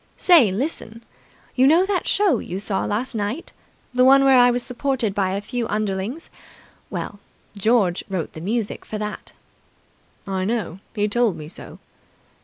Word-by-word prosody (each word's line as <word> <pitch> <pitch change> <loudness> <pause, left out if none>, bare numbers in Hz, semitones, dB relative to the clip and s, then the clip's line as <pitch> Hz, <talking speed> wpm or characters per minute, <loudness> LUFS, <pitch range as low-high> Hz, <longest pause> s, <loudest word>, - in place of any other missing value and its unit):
Say, 315 - +6
listen! 230 - -4 0.5
You 260 +1 +5
know 335 +6 +5
that 385 -3 -1
show 385 - +2
you 185 - -5
saw 200 -1 -2
last 230 +6 -2
night. 220 +8 -4 0.4
The 250 0 +3
one 275 +1 +7
where 265 -2 +6
I 245 0 +6
was 245 0 0
supported 250 -4 -1
by 190 -2 0
a 200 - -2
few 235 +2 -3
underlings. 210 - -3 0.6
Well, 205 - -5 0.4
George 200 -3 +2
wrote 185 -4 -3
the 160 - -8
music 215 +4 -2
for 215 - -6
that." 210 0 -6 0.9
"I 190 -2 -2
know. 210 -4 -2 0.2
He 210 -1 +1
told 225 -2 +1
me 150 - -8
so." 190 +9 -11
225 Hz, 160 wpm, -22 LUFS, 200-255 Hz, 0.9 s, one